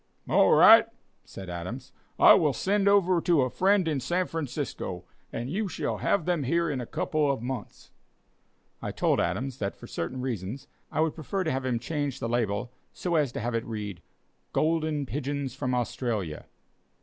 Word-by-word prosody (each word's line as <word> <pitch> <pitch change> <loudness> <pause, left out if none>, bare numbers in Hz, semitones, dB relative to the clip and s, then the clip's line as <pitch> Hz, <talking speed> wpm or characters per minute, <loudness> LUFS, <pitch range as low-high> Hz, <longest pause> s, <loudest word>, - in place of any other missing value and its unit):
"All - - +4
right," - - +8 0.4
said 95 - -9
Adams, 95 +10 -6 0.3
"I - - +9
will 150 -4 +3
send 200 - +1
over 185 -3 +4
to 165 -6 +3
a 125 - -2
friend 195 -1 +3
in 150 -3 0
San 175 +8 0
Francisco, 140 - -4 0.3
and 120 - -4
you 200 +9 -1
shall - - -3
have 185 -6 +1
them 175 -3 +1
here 165 +4 +1
in 130 -3 -2
a 120 - -6
couple 150 -2 0
of 130 -4 -4
months." 125 -3 -6 0.9
I - - -3
told - - +1
Adams 125 +10 -2
that, 100 -1 -2
for - - -12
certain 125 +10 -4
reasons, 120 -1 -4 0.2
I 155 - 0
would 160 -1 +1
prefer 185 +5 -3
to 160 - -1
have 130 0 -2
him 125 -2 0
change 140 +2 -3
the - - -2
label 115 -1 -1 0.2
so 180 - -3
as 150 -6 +2
to - - -4
have 120 +2 -2
it 115 0 0
read: 105 -5 -6 0.5
"Golden 155 -2 +1
Pigeons 140 -1 -3
from 130 -2 -2
Australia." 110 - -2
135 Hz, 180 wpm, -27 LUFS, 120-160 Hz, 0.9 s, I